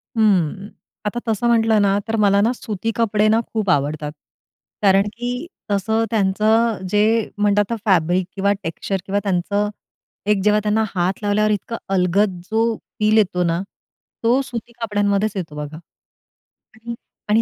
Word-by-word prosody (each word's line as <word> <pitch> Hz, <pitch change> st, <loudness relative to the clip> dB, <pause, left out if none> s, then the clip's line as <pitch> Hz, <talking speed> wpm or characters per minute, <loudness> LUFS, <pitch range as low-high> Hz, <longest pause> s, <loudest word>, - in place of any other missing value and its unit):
हं, 200 Hz, -3 st, +2 dB, 0.4 s
आता 225 Hz, +3 st, -1 dB
तसं 225 Hz, +2 st, 0 dB
म्हटलं 225 Hz, -2 st, +3 dB
ना 200 Hz, 0 st, +3 dB
तर 225 Hz, -, -1 dB
मला 200 Hz, 0 st, +4 dB
ना 225 Hz, -, +3 dB
सुती 220 Hz, -1 st, -4 dB
कपडे 215 Hz, -1 st, +2 dB
ना 225 Hz, -, +4 dB
खूप 215 Hz, -3 st, -1 dB
आवडतात. 150 Hz, 0 st, 0 dB, 0.7 s
कारण 195 Hz, 0 st, +4 dB
की 245 Hz, +6 st, -4 dB, 0.2 s
तसं 220 Hz, +3 st, +1 dB
त्यांचं 220 Hz, +2 st, +2 dB
जे 205 Hz, +2 st, +3 dB, 0.4 s
म्हणतात 205 Hz, 0 st, +2 dB
आता -, -, +1 dB
फॅब्रिक 180 Hz, -1 st, +2 dB
किंवा 200 Hz, +1 st, +2 dB
टेक्सचर 185 Hz, +4 st, -3 dB
किंवा 200 Hz, +1 st, 0 dB
त्यांचं 200 Hz, +2 st, 0 dB, 0.6 s
एक 195 Hz, -2 st, +2 dB
जेव्हा 210 Hz, 0 st, +4 dB
त्यांना 215 Hz, +1 st, +2 dB
हात 185 Hz, +3 st, 0 dB
लावल्यावर 215 Hz, +1 st, +2 dB
इतका 210 Hz, +3 st, -2 dB, 0.2 s
अलगद 185 Hz, +1 st, +2 dB
जो 220 Hz, +1 st, +2 dB, 0.4 s
फिल 215 Hz, +1 st, +3 dB
येतो 180 Hz, -4 st, +2 dB
ना, 170 Hz, +1 st, 0 dB, 0.6 s
तो 245 Hz, +4 st, +3 dB
सुती 240 Hz, -3 st, -7 dB
कपड्यांमध्येच 205 Hz, -1 st, +1 dB
येतो 165 Hz, -6 st, -5 dB
बघा 150 Hz, +1 st, -6 dB, 1.0 s
आणि 235 Hz, +1 st, -6 dB, 0.3 s
आणि 220 Hz, +2 st, +4 dB
205 Hz, 150 wpm, -20 LUFS, 190-220 Hz, 1.0 s, मला